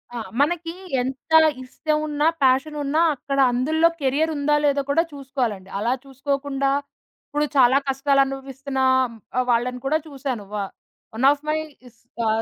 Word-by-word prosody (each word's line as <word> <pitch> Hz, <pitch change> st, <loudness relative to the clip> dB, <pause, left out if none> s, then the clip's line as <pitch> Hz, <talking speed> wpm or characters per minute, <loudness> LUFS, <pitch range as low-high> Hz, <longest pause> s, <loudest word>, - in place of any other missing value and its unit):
ఆ! -, -, -3 dB, 0.2 s
మనకి 330 Hz, +2 st, 0 dB, 0.3 s
ఎంత 260 Hz, +4 st, -6 dB, 0.3 s
ఇష్టం 305 Hz, +4 st, -2 dB
ఉన్నా, 295 Hz, +1 st, +1 dB, 0.2 s
ప్యాషనున్నా 285 Hz, +3 st, +2 dB, 0.2 s
అక్కడ 275 Hz, +1 st, -3 dB
అందుల్లో 310 Hz, +7 st, +3 dB
కెరియరుందా, 295 Hz, +1 st, +1 dB
లేదో 285 Hz, -1 st, +2 dB
కూడా 320 Hz, +4 st, +3 dB
చూసుకోవాలండి. 255 Hz, -9 st, -3 dB
అలా 235 Hz, +4 st, +1 dB
చూసుకోకుండా 275 Hz, 0 st, -2 dB, 0.6 s
ఇప్పుడు 295 Hz, +1 st, 0 dB
చాలా 260 Hz, 0 st, +6 dB
కష్టాలు 275 Hz, +1 st, +2 dB
అనుభవిస్తున్న 270 Hz, 0 st, -5 dB, 0.6 s
ఆ -, -, +4 dB
వాళ్ళని 250 Hz, +2 st, 0 dB
కూడా 300 Hz, +3 st, +2 dB
చూశాను. 265 Hz, -6 st, -4 dB
వ -, -, -3 dB, 0.6 s
వన్ 240 Hz, +4 st, +1 dB
ఆఫ్ 290 Hz, +1 st, -3 dB
మై 310 Hz, -, +1 dB, 0.4 s
స్ -, -, -31 dB, 0.2 s
కా 230 Hz, -, +1 dB
275 Hz, 135 wpm, -23 LUFS, 260-295 Hz, 0.6 s, చాలా